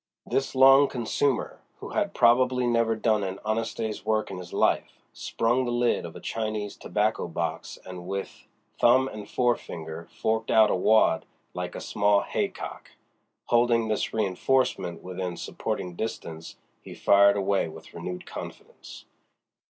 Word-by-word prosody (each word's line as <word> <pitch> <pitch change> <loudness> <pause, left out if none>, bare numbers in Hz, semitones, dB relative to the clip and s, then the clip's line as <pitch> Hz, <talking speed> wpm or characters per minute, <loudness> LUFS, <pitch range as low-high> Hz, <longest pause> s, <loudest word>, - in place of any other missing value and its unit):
This 135 0 -1
long 135 +2 +7
consumer, 125 +2 -1 0.2
who - - -8
had - - -1
probably 125 +1 +4
never 115 -1 +2
done 110 -1 +1
an 95 0 -3
honest 110 +1 -1
day's 110 -3 -3
work 110 0 0
in 90 - -6
his 90 -1 -10
life, - - +1 0.2
sprung 120 +3 0
the 120 - -2
lid 120 0 +1
of - - -12
a - - -8
Chinese 110 -2 -3
tobacco 105 -2 -1
box 85 -1 -4
and 90 -1 -8
with 100 0 -6 0.3
thumb 130 +2 +5
and 105 -5 -8
forefinger 85 -9 -2
forked 110 0 -1
out 110 -1 +5
a - - +2
wad 100 -2 +3 0.3
like - - -5
a - - -4
small 100 -1 +2
haycock. - - -4 0.6
Holding 120 -1 +3
this 110 - -1
reinforcement 100 -2 0
within 90 -1 -5
supporting 90 -1 -4
distance 85 -5 -6 0.3
he - - -10
fired 100 0 +5
away 100 -2 +1
with 80 - -12
renewed 90 +2 -6
confidence. - - -10
110 Hz, 145 wpm, -26 LUFS, 95-120 Hz, 0.6 s, long